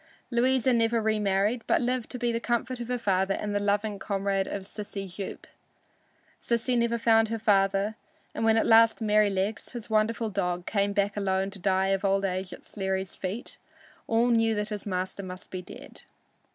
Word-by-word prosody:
Louisa 255 +1 +3
never 230 0 +2
remarried, 210 +1 +1
but - - +3
lived 250 -1 -1
to 250 - -5
be 240 -1 0
the 230 - -1
comfort 240 +1 -1
of 240 - -5
her 250 0 -1
father 195 -3 +1
and 205 -1 -3
the 205 - 0
loving 205 0 0
comrade 195 -1 -1
of 200 - -4
Sissy 200 0 -6
Jupe. 190 +2 -7 0.9
Sissy 235 +2 0
never 235 0 +1
found 225 -1 +4
her 225 - -1
father, 200 -1 +2 0.4
and - - -3
when 225 0 +4
at - - +3
last 225 0 +6
Merrylegs, 210 -1 +1
his 230 -2 -7
wonderful 220 +1 +1
dog, 180 -2 -1
came 200 -1 +1
back 200 0 0
alone 195 -1 0
to 195 - -10
die 190 0 +1
of 195 0 0
old 195 0 +2
age 185 0 -2
at - - -10
Sleary's 190 -2 -3
feet, 195 +6 -4 0.5
all 230 +2 +3
knew 225 -1 +3
that 210 0 -2
his 210 -1 -5
master 185 +1 -2
must 185 -1 -9
be 185 - -4
dead. 175 - -9
210 Hz, 185 wpm, -27 LUFS, 195-230 Hz, 0.9 s, last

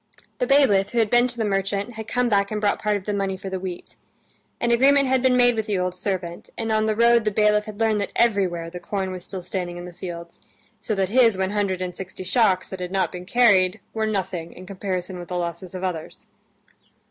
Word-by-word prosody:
The 250 - 0
bailiff, 230 -9 +4
who - - -2
had 225 -2 +2
been 240 +1 +5
to 240 -1 -7
the 225 - 0
merchant, 200 +2 -1
had 220 0 -7
come 245 +2 +1
back 200 -3 +2
and 215 - -2
brought 205 -1 0
part 210 -1 +1
of 190 - -10
the 210 - -2
money 195 -1 -1
for 195 0 -7
the 190 - -2
wheat. 180 -1 -7 0.6
An 240 - +1
agreement 275 +3 +5
had 260 -1 +2
been 255 -1 +3
made 245 -1 +5
with 220 -1 -2
the 205 -2 0
old 180 0 -1
servant, 180 -2 -4
and 225 -1 -2
on 215 0 +2
the 215 - +1
road 235 0 +4
the 215 - +1
bailiff 210 0 +2
had 215 -1 -9
learned 220 -2 +2
that 200 - -3
everywhere 185 -7 +1
the 180 - -7
corn 190 0 -3
was 185 -1 -7
still 185 -1 -7
standing 175 -1 -4
in 175 - -7
the 180 - -9
fields, 170 -1 -8 0.4
so 215 - -2
that 190 -1 0
his 230 -3 +4
one 190 0 -1
hundred 195 -3 -1
and 180 -1 -5
sixty 185 0 -7
shocks 185 -1 +2
that 190 - -7
had 180 0 -5
not 190 -1 0
been 180 -1 -8
carried 205 -4 +4
were 220 -1 -1
nothing 190 -5 -3
in 185 - -11
comparison 185 -1 -4
with 175 - -8
the 180 - -3
losses 175 +1 -5
of 185 - -5
others. 170 -4 -5
195 Hz, 240 wpm, -23 LUFS, 185-220 Hz, 0.6 s, been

